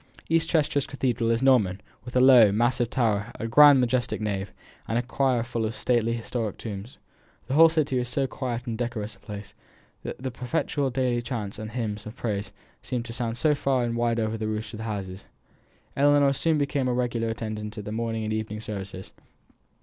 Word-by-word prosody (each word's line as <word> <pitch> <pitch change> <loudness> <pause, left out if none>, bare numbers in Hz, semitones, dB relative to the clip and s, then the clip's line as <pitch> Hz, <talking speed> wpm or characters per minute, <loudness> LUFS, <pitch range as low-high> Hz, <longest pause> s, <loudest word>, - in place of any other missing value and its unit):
East 165 0 +2
Chester 150 -4 +2
Cathedral 130 -4 -1
is 115 +2 +1
Norman, 110 -8 +4 0.3
with 125 - -9
a - - +5
low, 125 -5 +8
massive 120 +2 +1
tower, 110 -4 0
a 115 - -2
grand, 145 +3 +8
majestic 125 0 0
nave, 100 -3 -3 0.4
and 115 - 0
a 120 - +1
choir 130 -1 +1
full 120 -1 -3
of 110 +1 -2
stately 115 -2 +1
historic 115 -2 -3
tombs. 105 +2 -7 0.5
The 130 - -4
whole 165 +3 +8
city 150 -5 +1
is 125 -1 -3
so 135 +2 0
quiet 125 -2 -4
and 115 -3 -3
decorous 110 -2 -3
a - - -24
place, 105 -1 -9 0.5
that - - -6
the 130 0 -4
perpetual 135 +2 -1
daily 125 -1 0
chants 110 -4 -5
and 110 0 -5
hymns 110 -2 -4
of 110 - -9
praise 100 -5 -3 0.3
seemed 125 -2 -3
to 115 - -7
sound 115 -1 -3
far 140 -3 +2
and 120 -1 -1
wide 120 0 +1
over 110 0 -1
the 110 - -2
roofs 110 +1 -4
of 110 - -7
the 110 - -5
houses. 95 -3 -5 0.7
Ellinor 145 0 +4
soon 160 +3 +1
became 140 -2 0
a 125 - +1
regular 120 -2 -1
attendant 110 -1 -5
at 105 - -5
all - - -14
the 105 - -5
morning 115 0 -2
and 110 0 -2
evening 110 -1 -3
services. 100 -3 -7
120 Hz, 200 wpm, -26 LUFS, 110-130 Hz, 0.7 s, low